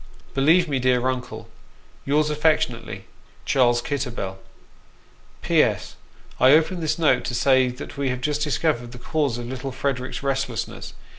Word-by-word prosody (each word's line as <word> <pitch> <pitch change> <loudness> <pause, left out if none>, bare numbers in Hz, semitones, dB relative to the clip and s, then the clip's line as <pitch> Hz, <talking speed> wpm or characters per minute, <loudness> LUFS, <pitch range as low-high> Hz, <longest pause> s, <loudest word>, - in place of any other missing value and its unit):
" - - -27
Believe 165 +6 +4
me, 140 -3 -1
dear 125 0 +2
Uncle, 125 -4 -4 0.3
" - - -31
Yours 150 +2 +2
affectionately, 150 +1 0 0.2
" - - -30
CHARLES 120 -2 +3
KITTEBBELL. 120 -9 -4 0.5
" - - -31
P.S. - - +1 0.4
I 130 +2 +7
open 165 +4 +3
this 160 -2 -1
note 150 -7 +3
to 120 - -3
say 130 +1 +4
that 125 +3 -7
we 140 -1 0
have 125 0 -2
just 150 +2 -1
discovered 145 -5 -1
the - - -9
cause 140 -1 -1
of 120 - -6
little 130 +2 -5
Frederick's 130 0 -3
restlessness. 135 -4 -3
130 Hz, 160 wpm, -23 LUFS, 125-150 Hz, 0.5 s, I